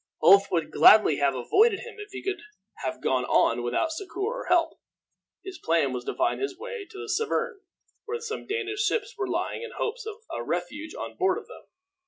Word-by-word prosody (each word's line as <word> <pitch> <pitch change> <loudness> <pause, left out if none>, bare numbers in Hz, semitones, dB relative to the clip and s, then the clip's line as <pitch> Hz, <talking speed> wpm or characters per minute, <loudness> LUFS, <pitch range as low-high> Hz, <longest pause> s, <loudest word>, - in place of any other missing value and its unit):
Ulf 200 +1 +7
would 165 -3 0
gladly 210 -9 +7
have 140 -2 +2
avoided 395 - +3
him 460 -3 -10
if 415 0 -8
he 400 - -8
could 390 0 -2 0.4
have 215 - -5
gone 130 -1 +1
on 120 0 +3
without 120 - 0
succor 365 +3 -7
or 465 +5 -2
help. 335 -2 +2 0.6
His 385 -1 -8
plan 160 -5 +1
was 125 -1 -4
to - - -3
find 345 +3 0
his 405 -2 -3
way 475 -1 -6
to 405 - -12
the 430 +2 -6
Severn, 450 0 -1 0.4
where 460 +1 -3
some 450 -1 -6
Danish 420 -1 -2
ships 440 +2 0
were 395 -3 -2
lying, - - -2
in 470 - -6
hopes 450 +1 -3
of 435 - -5 0.2
a - - -3
refuge 310 +1 -4
on - - -6
board 370 0 +2
of 450 - -8
them. - - -13
395 Hz, 205 wpm, -27 LUFS, -, 0.6 s, Ulf